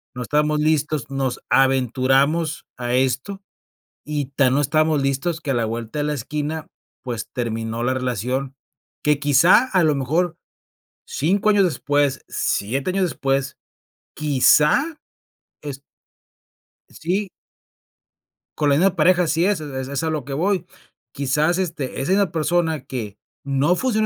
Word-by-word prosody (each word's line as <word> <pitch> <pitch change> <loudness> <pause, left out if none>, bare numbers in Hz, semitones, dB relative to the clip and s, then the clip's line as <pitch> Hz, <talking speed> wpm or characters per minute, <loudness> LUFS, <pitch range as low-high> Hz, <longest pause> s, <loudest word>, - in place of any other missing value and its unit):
no 125 - -4
estábamos 150 +3 +1
listos, 150 -3 0
nos 135 -2 -2
aventuramos 135 +5 +2
a 120 0 -1
esto, 130 +10 -1 0.7
y 145 -2 -1
tan 130 -2 +3
no 140 - +3
estábamos 155 +1 +2
listos 140 +5 -1
que 150 - -4
a - - -1
la 120 -1 +1
vuelta 115 +4 -4
de - - 0
la 150 - -1
esquina, 150 +4 -4 0.3
pues, 120 -4 -5
terminó 115 -1 -3
la 130 +2 +1
relación, 130 +2 -2 0.5
que 150 -1 +2
quizá, 145 - +5
a 185 -2 +4
lo 155 -2 +3
mejor 160 +6 0 0.7
5 195 +9 +1
años 205 -2 +4
después, 145 -5 0
7 135 - -1
años 190 +1 0
después, 135 -4 -1 0.6
quizá 150 - +3 0.6
es 145 -2 -6 1.1
Sí. 190 +5 -2 1.3
Con 150 -1 +2
la 140 - +4
misma 185 +5 +3
pareja 180 +2 +4
así 165 +1 +1
es, 200 -4 +1
e 140 -3 -5
es 135 +2 -4
a 160 - 0
lo 155 -5 -3
que 135 - -6
voy. 185 +6 0 0.5
Quizás, 150 +5 +1
este, 160 -9 -3
es 135 - -3
en 190 - +4
la 200 -3 +1
persona 160 -2 0
que 105 -6 -6 0.3
no 140 +5 +2
funcionó 220 -1 0
145 Hz, 145 wpm, -21 LUFS, 130-165 Hz, 1.3 s, quizá